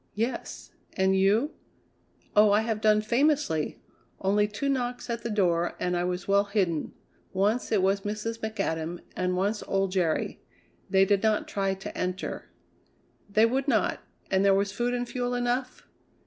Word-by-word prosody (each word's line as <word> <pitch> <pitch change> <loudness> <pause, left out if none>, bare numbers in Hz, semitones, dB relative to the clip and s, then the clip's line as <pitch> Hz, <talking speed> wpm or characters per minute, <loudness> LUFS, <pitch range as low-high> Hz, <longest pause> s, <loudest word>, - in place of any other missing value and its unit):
"Yes. 230 +4 -3 0.2
And 190 0 +2
you?" 205 +10 +3 0.8
"Oh! 210 0 +7
I 210 - +4
have 220 -1 -2
done 215 -1 +4
famously. 240 - +1 0.4
Only 205 +2 +2
two 215 +7 -3
knocks 250 -2 -2
at 235 0 -3
the 235 - -4
door, 175 -5 +1
and 180 0 0
I 175 0 0
was 180 +1 -3
well 200 +1 +4
hidden. 190 -7 -1 0.4
Once 205 +6 +1
it 205 -4 +3
was 195 +1 +2
Mrs. 215 +3 -4
McAdam 175 -6 -3
and 180 0 0
once 205 +3 0
old 195 -1 0
Jerry. 175 -4 0 0.5
They 195 -1 +5
did 200 0 +2
not 220 -1 +1
try 195 -1 -1
to 190 - -8
enter." 180 0 -4 0.8
"They 215 +2 +4
would 260 +4 0
not. 220 -8 +1 0.3
And 190 0 +3
there 195 -1 +5
was 200 0 +1
food 240 +4 -1
and 245 0 -2
fuel 245 0 -2
enough?" 245 +1 -2
205 Hz, 160 wpm, -27 LUFS, 190-230 Hz, 0.8 s, Oh